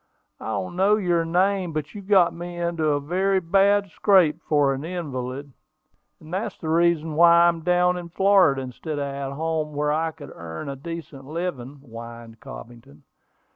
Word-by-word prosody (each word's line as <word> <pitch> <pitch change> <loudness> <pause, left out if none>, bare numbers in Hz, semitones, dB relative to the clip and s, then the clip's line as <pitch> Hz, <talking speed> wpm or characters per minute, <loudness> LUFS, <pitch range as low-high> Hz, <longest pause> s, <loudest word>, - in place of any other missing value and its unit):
"I - - -8
don't 100 - -3
know 195 +3 +4
your 175 -5 +1
name, 185 +1 +1
but 150 -1 -4
you 205 - -8
got 190 -3 +3
me 175 +1 -7
into 170 -2 -1
a 145 -1 +2
very 190 +6 0
bad 195 +2 +2
scrape 180 -5 +3
for 145 -3 +2
an 135 +2 -5
invalid; 140 -5 -5 0.7
and 160 +2 -12
that's 195 +5 -3
the 160 - -6
reason 165 -1 +2
why 170 +2 +6
I - - +6
am 170 -1 +1
down 180 +1 +2
in 175 -1 -7
Florida, 180 -7 +3
instead 145 +4 -6
of 140 - -2
at 140 0 -5
home 155 -1 -2
where 150 0 0
I 160 +2 0
could 145 -3 -12
earn 80 - -7
a 140 - -5
decent 150 -2 -8
living," 150 -4 -5
whined 115 -2 -11
Cobbington. 75 - -12
160 Hz, 175 wpm, -24 LUFS, 140-180 Hz, 0.7 s, why